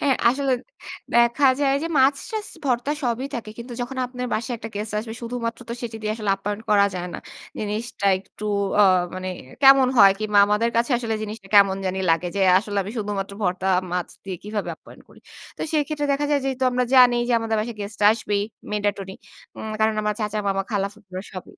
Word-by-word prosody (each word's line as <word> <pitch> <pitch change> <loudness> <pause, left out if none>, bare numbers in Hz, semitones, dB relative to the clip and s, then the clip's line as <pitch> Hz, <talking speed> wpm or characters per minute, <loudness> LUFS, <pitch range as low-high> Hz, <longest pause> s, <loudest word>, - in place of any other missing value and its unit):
হ্যাঁ, 275 -2 +2
আসলে, 270 +2 +1 0.6
দেখা 235 +4 +4
যায় 275 -1 +3
যে - - -1
মাছ-টাছ, 290 - +1 0.2
ভর্তা 255 +2 0
সবই 245 +1 -1
থাকে। 230 -3 -5
কিন্তু 240 +1 -8
যখন 245 +2 -4
আপনার 250 0 -5
বাসায় 240 +3 -2
একটা 225 - -7
গেস্ট 210 +1 -4
আসবে, 220 +1 -5
শুধুমাত্র 235 0 -4
তো - - -3
সেটি 230 -2 -5
দিয়ে 215 0 -1
আসলে 215 -3 -2
অ্যাপ্যায়ন 205 +2 -3
করা 200 -1 +5
যায় 180 0 -4
না। - - -4 0.4
জিনিসটা 210 0 -3
একটু 200 +2 -12 0.4
আ - - +8 0.3
মানে 185 0 -4 0.3
কেমন 270 -1 +7
হয় 195 -2 +9
কিংবা 210 -1 +1
আমাদের 210 +3 +1
কাছে 235 +4 +1
আসলে 230 -2 -2
জিনিসটা 210 -2 -7
কেমন 195 -1 +6
জানি 185 +1 -2
লাগে 165 +2 +1
যে, - - 0 0.2
আসলে 205 0 -5
আমি 195 - -7
শুধুমাত্র 200 -2 -3
ভর্তা, 180 0 -1 0.3
মাছ 180 -1 -1 0.2
দিয়ে 190 -2 -5
কিভাবে 210 0 -3
অ্যাপ্যায়ন - - -14
করি? - - -18 0.4
তো - - -12
সেই 305 -2 +3
ক্ষেত্রে 295 -1 -2
দেখা 280 +1 0
যায়, 290 -1 +2
যেহেতু 265 -1 -1
আমরা 250 0 +1
জানি 250 -2 +7
যে, - - +2
আমাদের 225 -1 -1
বাসায় 225 +1 -5
গেস্টরা 205 0 0
আসবেই, 210 -2 -1 0.3
mandatory. 205 -2 -2 0.4
উম 220 - -6
কারণ 220 0 +3
আমার 210 0 0
চাচা, 210 0 -2
মামা, 195 0 0
খালা, 200 -2 0
ফুফুরা 190 -3 -9
সব 185 -2 -7
220 Hz, 195 wpm, -23 LUFS, 200-245 Hz, 0.6 s, হয়